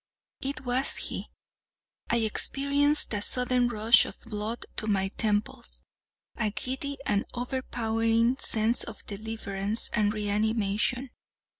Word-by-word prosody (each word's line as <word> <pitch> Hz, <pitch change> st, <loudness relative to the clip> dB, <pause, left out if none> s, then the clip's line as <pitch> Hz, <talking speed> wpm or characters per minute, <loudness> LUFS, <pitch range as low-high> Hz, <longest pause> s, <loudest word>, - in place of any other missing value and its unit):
It 265 Hz, -1 st, -3 dB
was 250 Hz, +2 st, +2 dB
he. -, -, -4 dB, 0.8 s
I -, -, +2 dB
experienced 280 Hz, +6 st, +2 dB
a 205 Hz, -, -1 dB
sudden 250 Hz, +2 st, +2 dB
rush 225 Hz, 0 st, +5 dB
of -, -, -9 dB
blood 220 Hz, +1 st, -5 dB
to 215 Hz, -, -1 dB
my 195 Hz, -2 st, +1 dB
temples—a 205 Hz, -, -4 dB
giddy 265 Hz, +6 st, -4 dB
and 205 Hz, -1 st, +1 dB
overpowering 235 Hz, -1 st, 0 dB
sense 225 Hz, +2 st, +3 dB
of 225 Hz, -, -10 dB
deliverance 210 Hz, 0 st, 0 dB
and 210 Hz, -2 st, +2 dB
reanimation. 215 Hz, +4 st, -1 dB
225 Hz, 110 wpm, -27 LUFS, 210-250 Hz, 0.8 s, rush